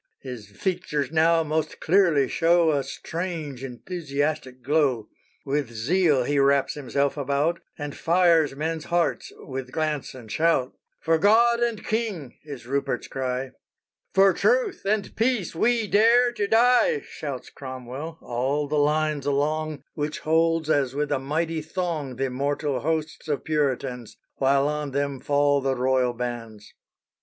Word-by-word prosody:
_" - - -39
His 125 -6 -7
features 150 - -2
now 165 +1 +4
most 155 0 -2
clearly 165 -6 +3
show 165 +3 +3
A 140 -2 0
strange, 155 -1 -5
enthusiastic 140 -1 -3
glow. 135 -5 +1 0.4
With 140 -2 -1
zeal 140 +5 +2
he 145 +3 0
wraps 140 0 +3
himself 140 0 -1
about, 145 +4 0 0.2
And 145 -2 -5
fires 165 -4 +3
men's 160 +2 -3
hearts 170 -1 0
with 130 -1 -7
glance 155 -4 -2
and 115 -4 -11
shout. 160 -6 +1 0.3
"For 165 0 +2
God 235 +5 +5
and 235 -3 -1
king," 210 - -2
is 140 -5 -9
Rupert's 135 -1 -2
cry. 130 0 -3 0.6
"For 195 0 +6
truth 475 - +1
and 205 0 -1
peace 225 -5 0
we 230 +6 +2
dare 235 +4 +5
to 210 -4 -2
die!" 250 - +4
Shouts 140 -4 -7
Cromwell, 130 +4 -7
all 135 +5 -1
the 150 +1 0
lines 150 -1 +1
along, 150 +1 -1
Which 150 0 -3
holds 165 0 +2
as 140 -4 +1
with 145 0 -1
a 140 - +1
mighty 160 +4 -2
thong 155 -6 -3
Th' - - -6
immortal 140 +1 -1
hosts 160 0 -2
of 145 -2 -2
Puritans, 135 -6 -2 0.2
While 135 +1 +3
on 150 -2 -3
them 140 -1 -1
fall 145 0 +2
the 135 0 0
Royal 130 -1 +1
bans. 115 -3 -6
150 Hz, 145 wpm, -25 LUFS, 135-165 Hz, 0.6 s, For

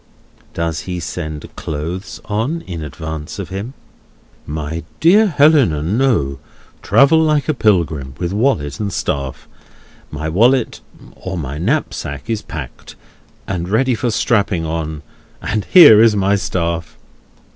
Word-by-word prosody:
Does 85 -1 -2
he 90 -1 -3
send 80 -4 -6
clothes 90 +9 -5
on 115 +10 -2
in 85 - -7
advance 80 +1 -6
of 100 -3 -6
him? 100 +8 -6 0.7
"My 75 +2 -4 0.2
dear 205 +6 +5
Helena, 145 - +3
no. 95 - +1 0.4
Travel 155 +4 +4
like 155 -2 +1
a 155 - +2
pilgrim, 85 - 0
with 85 +1 -3
wallet 105 - 0
and 105 -2 -2
staff. 70 -6 -3 0.6
My 75 +1 -5
wallet—or 110 -2 -1
my 70 -2 -5
knapsack—is 80 +4 -2
packed, 70 -6 -9 0.5
and 90 -2 -3
ready 130 +5 +2
for 120 +1 -1
strapping 100 -6 +1
on; 80 -2 -4 0.4
and 105 -1 -2
here 145 - +8
is 115 -2 +5
my 100 0 +2
staff!" 85 -4 -3
90 Hz, 125 wpm, -17 LUFS, 80-115 Hz, 0.7 s, here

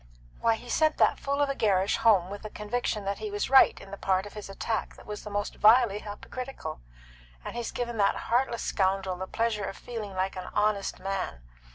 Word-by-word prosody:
Why, 230 -1 +3
he's 245 +2 -6
sent 310 -1 +3
that - - +3
fool 280 +1 0
of 285 - 0
a - - +1
Gerrish 195 -6 +2
home 195 -5 +4
with 205 - -6
the 215 - -7
conviction 210 0 -2
that 200 +1 -2
he 430 - -4
was 410 -8 -2
right 270 - +7
in 195 - -12
the 200 - -6
part 190 0 +1
of 205 - -10
his 210 -2 -8
attack 220 +3 -3
that - - -15
was 210 0 -6
the - - -7
most 205 0 -3
vilely 220 -1 +6
hypocritical, 245 - -7 0.7
and - - -5
he's 240 -1 -3
given 240 -1 -3
that 200 -1 +3
heartless 240 0 +1
scoundrel 190 -1 0
the 185 +1 -5
pleasure 225 -2 -1
of - - -6
feeling 215 -5 -6
like 190 +1 -1
an 185 -1 -6
honest 210 -1 +1
man. 190 - -3
210 Hz, 215 wpm, -28 LUFS, 195-240 Hz, 0.7 s, right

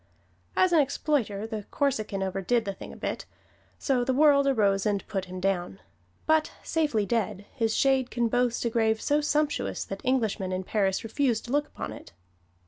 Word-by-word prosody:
As 370 -1 +4
an 330 - +6
exploiter, 265 -7 0
the 220 -2 -5
Corsican 215 -8 -1
overdid 195 +5 0
the 200 - -2
thing - - -10
a - - -11
bit - - -4 0.5
so 260 -4 +1
the 255 +1 0
world 280 -1 +5
arose 200 -7 +2
and 205 -2 -1
put 195 -3 -3
him 185 0 -7
down; 180 - -1 0.5
but 315 0 +2
safely 295 -11 0
dead, 205 -2 -1
his 225 -3 0
shade 265 -2 +2
can 240 -1 0
boast 245 0 0
a 235 - 0
grave 220 -1 +2
so 290 +5 +1
sumptuous 300 0 0
that 195 0 -6
Englishmen 220 -7 0
in 185 0 -2
Paris 195 -1 0
refuse 235 0 0
to 240 - -9
look 290 +1 +1
upon - - -6
it. - - -12
230 Hz, 180 wpm, -27 LUFS, 200-275 Hz, 0.5 s, an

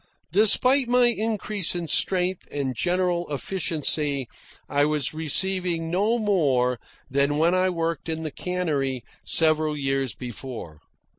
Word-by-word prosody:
Despite 250 +7 +4
my 245 0 +5
increase 215 -5 -1
in 170 -1 -3
strength 180 +3 +1
and 135 -3 -2
general 175 +2 0
efficiency, 145 -3 -1 0.4
I 145 0 +1
was 150 -2 0
receiving 165 +1 0
no 210 +6 +1
more 140 - +1 0.3
than 140 +2 +1
when 165 +3 +3
I 185 0 +2
worked 165 -1 -3
in 160 0 -3
the 155 - -4
cannery 145 -8 -2 0.2
several 155 -1 +2
years 135 -4 -1
before. 120 - -8
160 Hz, 125 wpm, -24 LUFS, 140-185 Hz, 0.4 s, my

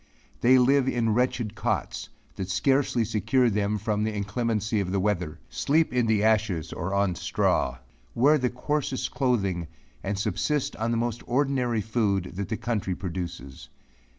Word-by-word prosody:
They 130 +2 +6
live 130 +1 +4
in 115 -4 +1
wretched 120 -2 0
cots, - - -2 0.3
that 95 -1 -5
scarcely 130 +3 +2
secure 115 +3 +2
them 105 +1 0
from 105 0 -1
the 110 - 0
inclemency 110 +1 -1
of 95 -2 -2
the 100 - +1
weather; 90 -5 -1
sleep 155 0 +1
in 125 -2 +2
the 110 -2 +2
ashes 110 -7 +1
or 85 +3 -3
on 100 -2 +2
straw, 65 -6 0 0.4
wear 145 +5 +5
the 125 -1 +1
coarsest 130 0 -2
clothing, 100 - 0 0.4
and 100 +1 -2
subsist 125 +7 -1
on 110 +1 -1
the 115 - +1
most 120 0 -2
ordinary 125 -3 +1
food 100 -4 0
that 100 +1 -4
the 110 - -1
country 105 -6 -2
produces. 85 -7 -6
110 Hz, 155 wpm, -26 LUFS, 100-125 Hz, 0.4 s, They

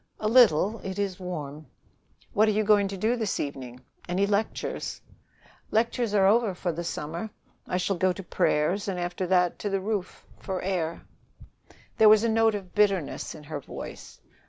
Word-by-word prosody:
"A 215 - -1
little. 220 -3 +5
It 190 0 -5
is 195 -2 -2
warm." 155 -5 -6 0.7
"What 215 +2 +4
are - - +4
you 215 +1 +1
going 205 -1 +4
to 195 0 -6
do 220 +6 +1
this 220 -4 -2
evening? 130 -3 -5 0.3
Any 185 +3 +2
lectures?" 205 +2 -2 0.7
"Lectures 230 -1 0
are 195 -2 +5
over 210 -1 +3
for 180 0 -2
the 170 +1 -5
summer. 165 +5 -4 0.4
I 180 - -1
shall 185 +1 -1
go 185 +2 +2
to 190 +2 -6
prayers, 175 +3 0
and 185 -2 -2
after 175 +1 -3
that 180 -1 +2
to 205 - -2
the 195 0 0
roof 200 -1 -4
for 190 -2 -4
air." 175 -3 -2 1.0
There 220 -1 +8
was 215 0 +6
a 230 - +2
note 225 -1 +3
of 190 -3 -7
bitterness 195 -7 0
in 150 - -11
her 150 0 -5
voice. - - -9
195 Hz, 180 wpm, -27 LUFS, 175-215 Hz, 1.0 s, There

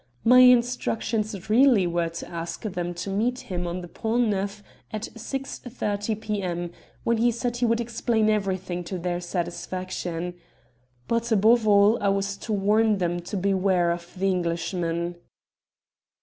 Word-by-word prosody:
My 250 +2 +7
instructions 235 -5 +3
really 230 -2 +5
were 170 -1 0
to 170 - -7
ask 170 0 -6
them 180 -4 -3
to 175 +3 -5
meet 240 +6 0
him 180 -2 -4
on 175 +1 -3
the 175 - -8
Pont 225 +6 0
Neuf 200 +1 -2 0.3
at 215 -1 -5
6.30 230 -4 -4
p.m., 185 -6 -3 0.3
when 235 0 +2
he 235 +2 +3
said 240 +1 -2
he 240 0 +1
would 230 0 +2
explain 230 -1 0
everything 190 -4 -1
to 185 +2 -4
their 175 0 -2
satisfaction. 175 0 -4 0.7
But, 230 0 0
above 220 +2 +4
all, 205 +2 +5
I 200 - +2
was 195 0 0
to 220 - -6
warn 210 +1 +3
them 175 -1 -1
to 180 +4 -5
beware 185 -2 +2
of 170 0 -5
the 190 - -1
Englishman." 170 -1 -1
200 Hz, 150 wpm, -25 LUFS, 175-225 Hz, 0.7 s, My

